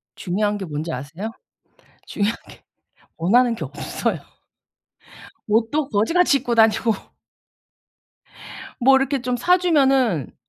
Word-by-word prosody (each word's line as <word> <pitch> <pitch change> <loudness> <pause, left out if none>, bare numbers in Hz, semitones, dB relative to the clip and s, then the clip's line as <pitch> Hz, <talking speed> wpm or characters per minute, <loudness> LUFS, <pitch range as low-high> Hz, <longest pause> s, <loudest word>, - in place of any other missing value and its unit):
중요한 205 +3 -1
게 195 - -6
뭔지 155 0 -5
아세요? 160 - -6 0.8
중요한 210 +3 -1
게 - - -16 0.5
원하는 235 +8 +3
게 230 - -6
없어요. - - -3 1.3
옷도 230 +7 +1
거지같이 285 - +2
입고 245 -2 -2
다니고 225 0 +3 1.9
뭐 265 +2 +6
이렇게 270 -1 0
좀 250 0 -1
사주면은 270 - +2
230 Hz, 230 characters per minute, -21 LUFS, 205-270 Hz, 1.9 s, 뭐